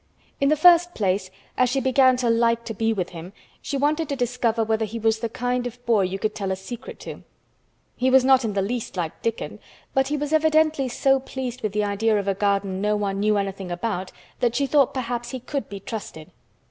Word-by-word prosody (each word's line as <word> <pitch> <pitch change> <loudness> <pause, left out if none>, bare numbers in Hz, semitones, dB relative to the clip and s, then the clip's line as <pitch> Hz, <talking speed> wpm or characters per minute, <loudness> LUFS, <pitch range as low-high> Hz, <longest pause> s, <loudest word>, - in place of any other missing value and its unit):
In 275 - +3
the 305 - +4
first 350 +2 +6
place, 190 -2 0 0.3
as 255 -1 +3
she 270 +2 +1
began 260 0 +4
to 250 -1 0
like 230 0 +2
to 225 - -4
be 225 +1 0
with 185 -5 -2
him, 175 +2 -9 0.3
she 280 - -3
wanted 300 +3 0
to 280 - -1
discover 240 -3 0
whether 220 0 0
he 220 +2 -4
was 220 0 +1
the 230 0 -2
kind 245 +2 -1
of 245 +1 -11
boy 225 -4 +3
you 190 +1 -1
could 215 +2 -2
tell 195 -2 -3
a - - 0
secret 220 +5 -9
to. - - -8 0.7
He 255 +1 +1
was 260 0 +5
not 265 -1 +5
in 220 -3 -2
the 195 -1 0
least 230 -1 -4
like 165 -3 -4
Dickon, 230 -1 -3 0.3
but 270 0 +2
he 295 +2 -1
was 295 +1 -3
evidently 310 -2 +3
so 270 +2 +2
pleased 255 -2 -6
with 210 -2 -2
the 210 0 +1
idea 210 +2 +1
of 200 -1 -2
a 195 - +2
garden 195 -1 0
no 210 +1 +1
one 200 -1 -2
knew 210 +1 +2
anything 195 -2 -3
about 185 +1 -3 0.3
that 240 -2 +1
she 280 +3 +2
thought 275 -1 +3
perhaps 240 -1 -3
he 260 - -5
could 275 +3 -4
be 200 - -7
trusted. 195 -7 -7
230 Hz, 225 wpm, -24 LUFS, 200-260 Hz, 0.7 s, first